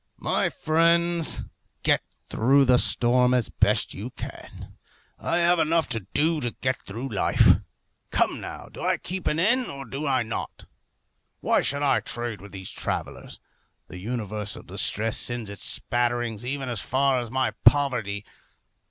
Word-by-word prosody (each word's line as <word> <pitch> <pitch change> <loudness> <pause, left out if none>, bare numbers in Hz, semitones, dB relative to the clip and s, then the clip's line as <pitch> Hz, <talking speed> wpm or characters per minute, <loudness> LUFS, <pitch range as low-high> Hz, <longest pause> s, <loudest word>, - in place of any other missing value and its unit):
My - - 0
friends, 170 +1 +2 0.4
get - - +3 0.3
through 135 +5 +3
the 125 -1 +5
storm 125 +1 +4
as 125 -3 +1
best - - +2
you - - -6
can. - - -10 0.5
I 170 - 0
have 175 0 +3
enough 165 +1 +2
to 110 -5 -3
do 155 +1 +2
to 120 -2 -3
get 130 0 -1
through 115 +7 -6
life. - - +4 0.5
Come - - +1
now, - - -7
do - - -11
I - - +1
keep 185 0 -5
an 150 - +1
inn, 235 +9 +2
or 140 0 -7
do 135 +6 -4
I 130 -3 +2
not? 110 0 -6 0.7
Why - - +2
should 140 +1 -1
I 140 - +3
trade 120 -5 -4
with 100 - -12
these 95 -2 -6
travellers? - - -4 0.5
The 90 - -8
universal 105 -1 -4
distress 110 +1 0
sends 120 -4 -3
its 100 - -5
spatterings 120 -2 -1
even 135 +1 -3
as 120 -5 -2
far 130 0 +1
as 120 - -6
my 130 +2 0
poverty. 115 -8 +3
125 Hz, 155 wpm, -25 LUFS, 115-145 Hz, 0.7 s, the